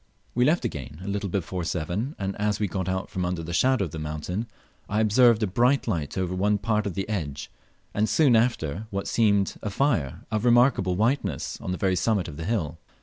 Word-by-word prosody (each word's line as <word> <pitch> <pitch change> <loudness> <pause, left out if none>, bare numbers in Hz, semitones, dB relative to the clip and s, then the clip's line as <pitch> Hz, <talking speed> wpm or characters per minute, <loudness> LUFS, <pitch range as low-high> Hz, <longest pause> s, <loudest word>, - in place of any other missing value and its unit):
We 125 +1 +3
left 155 -1 +2
again 75 - -5
a - - -7
little 100 0 -2
before 90 -1 -2
seven, 90 - -2
and 95 0 -3
as 105 0 0
we 105 - +1
got 95 +1 -3
out 95 +1 -2
from 95 - -3
the 85 0 -5
shadow 125 +3 +3
of 80 - -7
the 80 - -6
mountain 75 +8 -4 0.4
I 105 - 0
observed 110 +1 +5
a - - +4
bright 120 +9 +2
light 80 -9 -2
over 90 -1 -1
one 100 +3 +2
part 105 0 0
of 95 - -4
the 95 -1 -2
edge, 75 -10 -4 0.4
and 105 +1 +1
soon 145 -7 +4
after, 110 - 0
what 100 -2 -3
seemed 100 -4 +2
a 105 - -3
fire 100 - 0
of 110 0 0
remarkable 120 -6 +4
whiteness 115 +8 -1
on - - -4
the 90 - -2
very 95 0 +1
summit 95 0 +1
of 75 -3 -8
the 80 - -5
hill. 85 -7 -2
100 Hz, 210 wpm, -26 LUFS, 90-115 Hz, 0.4 s, observed